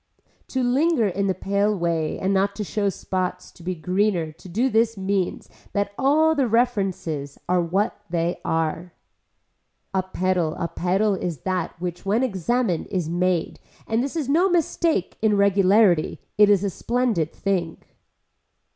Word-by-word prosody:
To 260 -1 -1
linger 260 0 +2
in 200 +1 -1
the 190 - 0
pale 200 +2 0
way 170 -3 -1
and 190 +1 0
not 200 +1 +1
to 210 - -3
show 205 0 -1
spots 185 -1 -3
to - - -18
be 180 +2 -3
greener 180 -1 0
to 165 +4 -14
do 225 +9 +1
this 225 -2 +2
means 190 -1 -1 0.3
that 200 0 0
all 305 +6 +3
the 275 -5 +1
references 195 - -1
are 180 0 +2
what 190 +6 -1
they 170 +1 -1
are. 165 +2 -2 1.0
A 190 - +2
pedal 185 -3 -1
a 170 - -1
pedal 195 +5 +1
is 175 -6 -4
that 185 -3 -3
which 175 -1 -5
when 210 +6 +1
examined 215 -3 0
is 180 -4 -2
made 175 -1 0 0.3
and 225 +2 0
this 280 +4 -4
is 310 -5 -2
no 340 +7 +3
mistake 330 - 0
in 215 -2 +3
regularity 200 -3 +3 0.2
it 210 0 +6
is 200 -2 +4
a 200 - 0
splendid 235 -8 0
thing. 180 -5 -2
195 Hz, 155 wpm, -23 LUFS, 175-225 Hz, 1.0 s, it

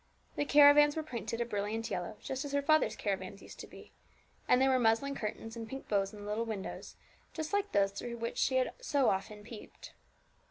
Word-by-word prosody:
The 290 - 0
caravans 290 0 +7
were 315 - -2
painted 235 -4 -4
a - - +1
brilliant 220 +1 -3
yellow, 180 +3 -4
just 265 0 -3
as 285 -1 -6
her 285 0 +1
father's 310 -7 +3
caravans 195 -1 -4
used - - -12
to - - -8
be; - - -14 0.6
and 250 - +5
there 265 0 +4
were 260 - +3
muslin 235 +4 +2
curtains 225 -1 -5
and 225 -1 -7
pink 270 0 -7
bows 195 -2 +1
in 210 -2 -11
the - - -8
little 210 +2 -1
windows, 215 -4 -6 0.4
just 315 +3 -5
like 405 0 0
those 195 -1 +3
through 235 +4 -6
which 230 0 -4
she 260 - +2
had 260 0 +1
so 285 - +2
often 210 +2 -4
peeped. 225 0 -11
230 Hz, 210 wpm, -32 LUFS, 210-280 Hz, 0.6 s, caravans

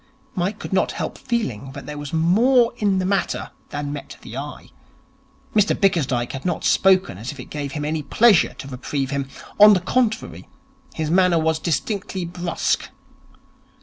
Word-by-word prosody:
Mike 190 +4 -1
could - - -7
not 190 - +1
help - - -4
feeling 140 - -3
that 140 - -8
there 150 - -6
was 145 -1 -6
more 230 +10 +4
in 200 -3 +1
the 185 - 0
matter 195 0 -1 0.2
than 145 0 -4
met 145 - -8
the - - -9
eye. - - -7 0.8
Mr 210 -1 +3
Bickersdyke 140 - +1
had 135 0 -6
not 175 -3 -2
spoken 185 - +3
as 115 +4 -5
if 145 - -12
it 125 - -10
gave 145 -2 -4
him 150 -2 -3
any 155 +1 -1
pleasure 215 +5 +4
to - - -9
reprieve 135 +1 -3
him. 140 -1 -2 0.3
On 210 0 +10
the 190 - +3
contrary, 225 +4 -1 0.5
his 155 -1 -2
manner 180 -1 +4
was 160 0 +1
distinctly 185 +4 -2
brusque. 175 0 -2
170 Hz, 170 wpm, -22 LUFS, 145-195 Hz, 0.8 s, On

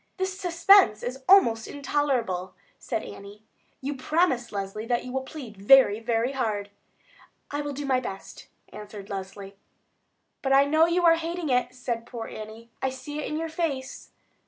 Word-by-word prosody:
"This 375 0 -2
suspense 350 - +5
is 260 +2 -5
almost 230 - +5
intolerable," 250 -11 -1 0.2
said 225 -3 -3
Annie. 200 +2 -11 0.4
"You 280 +2 -3
promise, 265 -3 0
Leslie, 200 +2 -5
that 240 0 0
you 250 - -6
will 265 - -1
plead 260 -6 -9
very, 210 0 +6
very 230 +2 0
hard." 210 -6 -2 0.8
"I 290 +1 -2
will 290 0 -4
do 285 +1 -5
my 260 -2 +2
best," 195 -6 -8 0.2
answered 205 -1 -10
Leslie. 195 0 -7 0.8
"But 270 -1 +1
I 275 +1 +6
know 315 +3 +4
you 350 +1 +1
are 330 -1 +6
hating 335 -1 -4
it," 250 0 +1
said 240 -2 -4
poor 235 -3 -6
Annie. 220 +2 -10
"I 265 - +1
see 265 +3 -7
it - - -3
in 305 - -3
your 325 +1 -2
face." 295 -5 -4
255 Hz, 165 wpm, -26 LUFS, 215-295 Hz, 0.8 s, very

